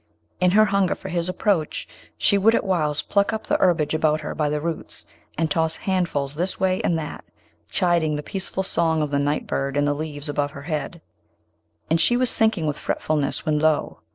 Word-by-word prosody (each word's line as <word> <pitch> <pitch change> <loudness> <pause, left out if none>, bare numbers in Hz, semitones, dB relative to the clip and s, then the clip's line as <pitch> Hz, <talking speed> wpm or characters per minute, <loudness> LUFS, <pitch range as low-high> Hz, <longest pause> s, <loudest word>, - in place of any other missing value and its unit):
In 180 - +4
her 215 +4 +5
hunger 200 -2 +1
for 190 - -8
his 175 0 -1
approach, 185 -4 0 0.3
she 200 - +3
would 215 +3 +4
at - - +1
whiles 155 -6 0
pluck 200 -1 +1
up 220 - -4
the - - +1
herbage 165 -5 +2
about 155 -1 +1
her 150 - -4
by 150 -1 0
the 150 0 -1
roots, 165 +1 -5 0.3
and 160 -1 0
toss 160 +1 +1
handfuls 170 -8 -1
this 175 +5 -2
way 185 -1 +1
and 170 - +1
that, 150 -2 -6 0.5
chiding 170 -4 +1
the 150 - -4
peaceful 190 0 -3
song 160 -4 +1
of 150 - -3
the 140 - +1
nightbird 140 -1 -1
in 145 - +2
the 145 - +2
leaves 145 0 -5
above 145 0 -1
her 140 - -9
head; 155 +2 -4 0.9
and 165 +1 +3
she 240 +7 +4
was 255 -1 +4
sinking 220 -7 +2
with 150 -1 -2
fretfulness, 150 -3 -1
when 150 -1 +1
lo! 155 -1 +1
160 Hz, 200 wpm, -23 LUFS, 150-185 Hz, 0.9 s, her